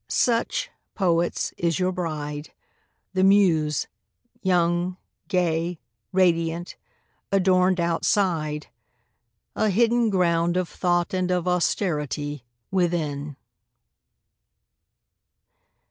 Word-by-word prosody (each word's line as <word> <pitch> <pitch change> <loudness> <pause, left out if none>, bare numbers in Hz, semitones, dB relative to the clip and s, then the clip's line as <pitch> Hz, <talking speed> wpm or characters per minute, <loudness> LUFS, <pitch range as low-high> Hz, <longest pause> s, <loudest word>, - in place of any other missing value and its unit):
Such, 245 - 0 0.2
poets, 175 -3 0
is 170 -1 +1
your 185 0 +1
bride, 150 -4 -4 0.6
the 190 0 +2
Muse! 175 -7 +3 0.6
young, 175 0 +1 0.3
gay, 175 -3 0 0.3
Radiant, 170 -2 +1 0.6
adorned 185 -1 +3
outside; 165 -3 0 0.9
a 215 - +2
hidden 235 +3 +3
ground 175 -2 +2
Of 185 -1 0
thought 175 0 0
and 185 -1 0
of 180 -1 0
austerity 150 - -1 0.3
within. 155 -6 -1
175 Hz, 80 wpm, -24 LUFS, 165-185 Hz, 0.9 s, Muse